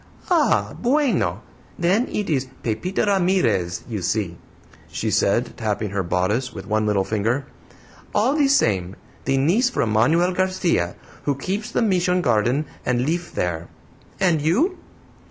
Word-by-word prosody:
"Ah, 320 Hz, -5 st, +3 dB
BUENO! 235 Hz, -, +1 dB, 0.3 s
Then 190 Hz, +8 st, +2 dB
it 210 Hz, -2 st, -3 dB
is 135 Hz, -5 st, 0 dB, 0.2 s
Pepita 180 Hz, -, -1 dB
Ramirez, 180 Hz, -, +1 dB
you 110 Hz, -5 st, -4 dB
see," 95 Hz, -2 st, -1 dB, 0.5 s
she -, -, -3 dB
said, -, -, +1 dB
tapping 105 Hz, -1 st, -2 dB
her 100 Hz, -1 st, 0 dB
bodice 95 Hz, +8 st, 0 dB
with -, -, -8 dB
one 110 Hz, 0 st, 0 dB
little 100 Hz, -2 st, +2 dB
finger, 115 Hz, +7 st, -1 dB, 0.7 s
"all 235 Hz, +7 st, +3 dB
the 295 Hz, -2 st, +3 dB
same; 95 Hz, -, +2 dB, 0.3 s
the 135 Hz, 0 st, +1 dB
niece 185 Hz, -, +3 dB
from 120 Hz, -, -1 dB
Manuel 160 Hz, +12 st, +3 dB
Garcia, 180 Hz, -, 0 dB, 0.3 s
who 145 Hz, -, +1 dB
keeps 195 Hz, -, -3 dB
the -, -, 0 dB
Mission 180 Hz, -3 st, +2 dB
garden 120 Hz, +6 st, +2 dB, 0.2 s
and 125 Hz, 0 st, 0 dB
lif 170 Hz, +3 st, -2 dB
there. 85 Hz, -1 st, -2 dB, 0.5 s
And 175 Hz, -5 st, +2 dB
you?" 265 Hz, -, +1 dB
145 Hz, 140 wpm, -22 LUFS, -, 0.7 s, Ah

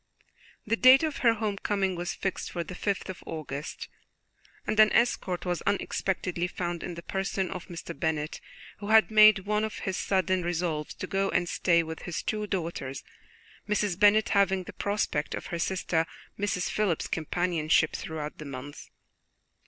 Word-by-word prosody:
The 225 Hz, -, +1 dB
date 255 Hz, +4 st, +7 dB
of 310 Hz, -3 st, -1 dB
her 230 Hz, -2 st, +4 dB
homecoming 200 Hz, -3 st, -1 dB
was 175 Hz, 0 st, -3 dB
fixed 195 Hz, -, -3 dB
for 175 Hz, -, -2 dB
the 180 Hz, -, -8 dB
fifth 200 Hz, +2 st, -2 dB
of 190 Hz, -, -7 dB
August, 150 Hz, -1 st, -5 dB, 0.8 s
and 215 Hz, -, -1 dB
an 215 Hz, 0 st, +7 dB
escort 185 Hz, -7 st, +1 dB
was 175 Hz, -1 st, -1 dB
unexpectedly 185 Hz, -3 st, -1 dB
found 175 Hz, -1 st, -4 dB
in 175 Hz, -, -5 dB
the 170 Hz, -, -8 dB
person 190 Hz, 0 st, -2 dB
of 180 Hz, -2 st, -6 dB
Mr. 170 Hz, -1 st, -7 dB
Bennet, 155 Hz, -2 st, -2 dB, 0.4 s
who 205 Hz, -, -6 dB
had 220 Hz, +1 st, +5 dB
made 215 Hz, -2 st, +7 dB
one 210 Hz, +1 st, +1 dB
of 220 Hz, -, -3 dB
his 190 Hz, -1 st, -1 dB
sudden 185 Hz, -1 st, +1 dB
resolves 170 Hz, -3 st, -2 dB
to -, -, -5 dB
go 195 Hz, +1 st, 0 dB
and 175 Hz, -1 st, +1 dB
stay 170 Hz, -1 st, +2 dB
with 160 Hz, 0 st, -7 dB
his 175 Hz, -, -4 dB
two 210 Hz, -1 st, -2 dB
daughters, 165 Hz, -8 st, -3 dB, 0.7 s
Mrs. 205 Hz, -3 st, 0 dB
Bennet 210 Hz, +1 st, +5 dB
having 195 Hz, -2 st, +3 dB
the -, -, -10 dB
prospect 200 Hz, -7 st, -1 dB
of -, -, -6 dB
her 170 Hz, -, -1 dB
sister, 170 Hz, -2 st, 0 dB, 0.3 s
Mrs. 195 Hz, -3 st, -1 dB
Phillips's, 200 Hz, -7 st, 0 dB
companionship 160 Hz, -1 st, +1 dB
throughout 155 Hz, -2 st, -5 dB
that 155 Hz, -, -7 dB
month. 140 Hz, +1 st, -8 dB
185 Hz, 165 wpm, -28 LUFS, 170-205 Hz, 0.8 s, date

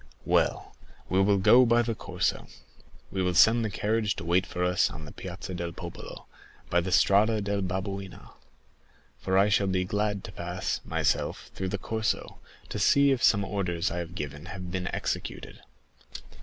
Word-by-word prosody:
"Well, -, -, +1 dB, 0.3 s
we 95 Hz, +1 st, +3 dB
will 100 Hz, +1 st, +3 dB
go 120 Hz, +6 st, +6 dB
by 120 Hz, 0 st, +4 dB
the 115 Hz, 0 st, -1 dB
Corso. -, -, -2 dB, 0.6 s
We 95 Hz, -, -2 dB
will 90 Hz, -1 st, 0 dB
send 115 Hz, +5 st, +6 dB
the 110 Hz, -, -1 dB
carriage 105 Hz, +1 st, 0 dB
to -, -, -7 dB
wait 90 Hz, +2 st, +2 dB
for 90 Hz, -, -3 dB
us 90 Hz, 0 st, +2 dB
on 80 Hz, -, -9 dB
the 75 Hz, -, -10 dB
Piazza 95 Hz, +1 st, -7 dB
del 85 Hz, -1 st, -4 dB
Popolo, 85 Hz, -1 st, -9 dB, 0.5 s
by 85 Hz, -, +3 dB
the 90 Hz, -, -4 dB
Via 105 Hz, +4 st, +4 dB
del 100 Hz, 0 st, -1 dB
Babuino, 95 Hz, +1 st, -5 dB, 0.9 s
for 95 Hz, +7 st, 0 dB
I 100 Hz, +1 st, +5 dB
shall 100 Hz, -1 st, +2 dB
be 95 Hz, -1 st, 0 dB
glad 105 Hz, +1 st, -1 dB
to -, -, -8 dB
pass, -, -, -3 dB
myself, -, -, -1 dB
through 95 Hz, 0 st, -3 dB
the 100 Hz, -, -2 dB
Corso, 110 Hz, +3 st, -3 dB, 0.3 s
to -, -, -4 dB
see 140 Hz, 0 st, +5 dB
if 130 Hz, -3 st, 0 dB
some 100 Hz, -2 st, +4 dB
orders 90 Hz, -5 st, -1 dB
I 85 Hz, -, -3 dB
have 85 Hz, 0 st, -6 dB
given 75 Hz, -1 st, -6 dB
have 90 Hz, -1 st, -7 dB
been 90 Hz, 0 st, -3 dB
executed." -, -, -4 dB
95 Hz, 175 wpm, -28 LUFS, 90-105 Hz, 0.9 s, go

